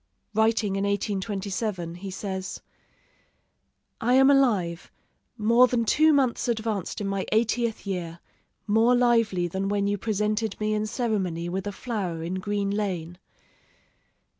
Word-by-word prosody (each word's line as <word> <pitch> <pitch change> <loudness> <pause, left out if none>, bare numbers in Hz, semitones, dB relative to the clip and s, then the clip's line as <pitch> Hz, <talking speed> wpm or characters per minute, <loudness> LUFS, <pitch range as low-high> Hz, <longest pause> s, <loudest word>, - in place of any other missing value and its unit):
Writing 220 -2 +2
in 195 - -1
1827, 200 -2 -2
he 185 +3 -7
says: 190 0 -5 1.4
"I 245 +3 +3
am 270 +1 +6
alive, 205 -12 +2 0.5
more 235 +3 +5
than 240 -2 0
two 310 +7 +4
months 265 -6 +1
advanced 220 -5 -2
in 200 - -2
my 195 -1 -2
eightieth 225 +1 0
year, 175 -4 -4 0.5
more 225 +3 +4
lively 230 -7 +2
than 190 +3 -2
when 200 -1 0
you 205 0 0
presented 215 0 -1
me 215 0 0
in 215 0 -1
ceremony 190 -8 -2
with 190 +2 -3
a - - -2
flower 195 -8 -4
in 180 +3 -3
Green 200 0 -1
Lane. 180 -5 -3
205 Hz, 135 wpm, -26 LUFS, 190-230 Hz, 1.4 s, am